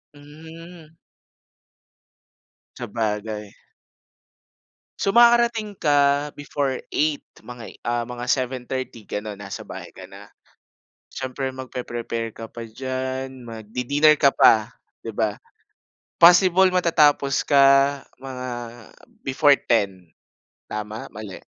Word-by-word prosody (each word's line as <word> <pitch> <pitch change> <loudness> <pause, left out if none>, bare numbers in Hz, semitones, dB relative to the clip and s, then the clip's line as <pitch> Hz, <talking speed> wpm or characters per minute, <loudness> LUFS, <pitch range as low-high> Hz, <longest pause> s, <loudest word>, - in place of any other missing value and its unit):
Hmm. 160 +2 -13 1.8
Sabagay. 105 -1 -4 1.4
So 195 - +1
makakarating 235 -2 +4
ka 145 -2 +2
before 140 -2 -2
8, 150 -1 -1 0.2
mga, 120 -2 -11
ah, 120 0 -1 0.2
7:30 130 -2 -3
ganon 105 0 -5
nasa 100 - -8
bahay - - -9
ka - - -12
na. - - -14 0.8
Siyempre 130 0 -4
magpre-prepare 120 -3 -5
ka 115 0 -9
pa 115 -1 -8
diyan, 130 +1 -5
magdi-dinner 125 +7 +1
ka 140 -2 +4
pa, 110 -1 +4 0.3
'di 115 - -5
ba? 105 -1 -1 0.8
Possible 180 +2 +7
matatapos 150 -6 +3
ka 140 -2 +6 0.6
mga 130 -1 -7 0.8
before 140 +1 +4
10, 95 -7 0 0.6
tama, 105 +1 -6
mali? 105 -2 -9
130 Hz, 90 wpm, -23 LUFS, 115-150 Hz, 1.8 s, Possible